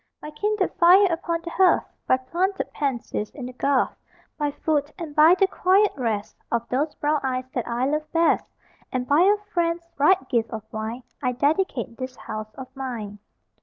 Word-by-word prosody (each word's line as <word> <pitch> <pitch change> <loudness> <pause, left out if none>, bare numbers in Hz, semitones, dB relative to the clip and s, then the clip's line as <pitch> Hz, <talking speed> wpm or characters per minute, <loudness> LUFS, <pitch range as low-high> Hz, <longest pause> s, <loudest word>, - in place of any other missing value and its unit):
By 300 - -8
kindled 410 +5 -1
fire 365 +4 +7
upon 335 0 -2
the 340 - -6
hearth, 370 0 +4 0.2
By 255 - +4
planted 360 +9 -2
pansies 250 -6 -2
in 270 -4 -6
the 255 - -7
garth, 275 +1 +1 0.4
By 295 -1 -1
food, 290 0 -1
and 320 -5 -7
by 315 +3 +7
the 390 - +4
quiet 385 +2 +3
rest 225 -6 -2 0.2
Of 235 0 -1
those 295 +4 -1
brown 300 +1 +1
eyes 255 -1 -2
that 245 - -2
I 240 +2 0
love 305 +2 -2
best, 330 0 +2 0.4
And 250 -1 -2
by 290 +3 +4
a 405 +3 +5 0.2
friend's 335 -1 0
bright 295 -1 +3
gift 230 -2 0
of 220 -2 -6
wine, 220 +3 -4 0.2
I 250 -2 0
dedicate 280 -3 0
this 255 -1 -6
house 215 -2 -7
of 260 0 -10
mine. 230 -6 -5
285 Hz, 180 wpm, -24 LUFS, 250-335 Hz, 0.4 s, fire